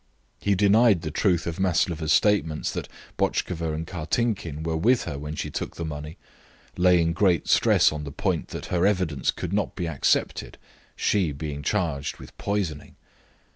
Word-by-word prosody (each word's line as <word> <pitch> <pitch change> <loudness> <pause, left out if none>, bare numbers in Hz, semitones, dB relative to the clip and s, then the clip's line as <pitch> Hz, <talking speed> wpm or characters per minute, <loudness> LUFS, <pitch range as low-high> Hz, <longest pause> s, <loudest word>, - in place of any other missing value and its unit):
He 100 -1 +1
denied 105 -1 +4
the 80 - -3
truth 85 0 +1
of 85 0 -4
Maslova's 85 -4 +1
statements 80 -7 +2
that - - -5 0.3
Botchkova 80 -3 -1
and 80 +1 -4
Kartinkin 85 -1 -2
were 80 0 -1
with 120 +10 +3
her 70 - -5
when 75 +1 -5
she - - -4
took - - -4
the 85 - -4
money, 75 +1 -6 0.6
laying 90 -2 +4
great 90 -2 +2
stress - - +4
on 75 -1 -5
the 70 - -6
point - - -1
that - - -7
her 90 +2 +3
evidence 90 -8 0
could 90 +1 -2
not 105 0 -1
be 90 -3 -3
accepted, 75 -5 0 0.4
she 95 -7 +1
being 75 0 -5
charged 80 -6 -1
with - - -13
poisoning. 100 -7 -3
85 Hz, 165 wpm, -25 LUFS, 75-95 Hz, 0.6 s, denied